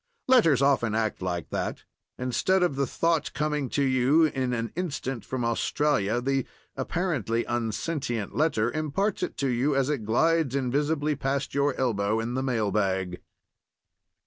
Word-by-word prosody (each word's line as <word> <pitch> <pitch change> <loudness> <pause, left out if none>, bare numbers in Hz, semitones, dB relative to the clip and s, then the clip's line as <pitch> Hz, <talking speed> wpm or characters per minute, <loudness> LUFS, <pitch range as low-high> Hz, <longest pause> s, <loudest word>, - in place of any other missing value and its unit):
Letters 225 - +5
often 120 -6 +2
act 110 -3 -1
like 90 -4 -3
that. - - -3 0.3
Instead 180 +9 +1
of 175 -6 +1
the 140 -1 0
thought 165 -3 0
coming 150 -3 -1
to 140 - 0
you 130 +4 +4
in 130 -4 -1
an 115 -1 -2
instant 140 - -3
from 130 -2 -3
Australia, 115 -1 +1
the 135 +1 -1 0.3
(apparently) 130 - -1
unsentient 120 0 -2
letter 135 -7 +1
imparts 155 +7 -1
it - - -3
to 140 - 0
you 130 +3 +1
as 135 +1 +2
it 140 -7 -2
glides 145 +5 +2
invisibly 145 +3 0
past 135 0 -2
your 140 0 +1
elbow 110 -4 0
in 115 +2 -3
the 130 - -1
mail 115 -6 0
bag. 95 -3 -1
135 Hz, 150 wpm, -27 LUFS, 115-150 Hz, 0.3 s, Letters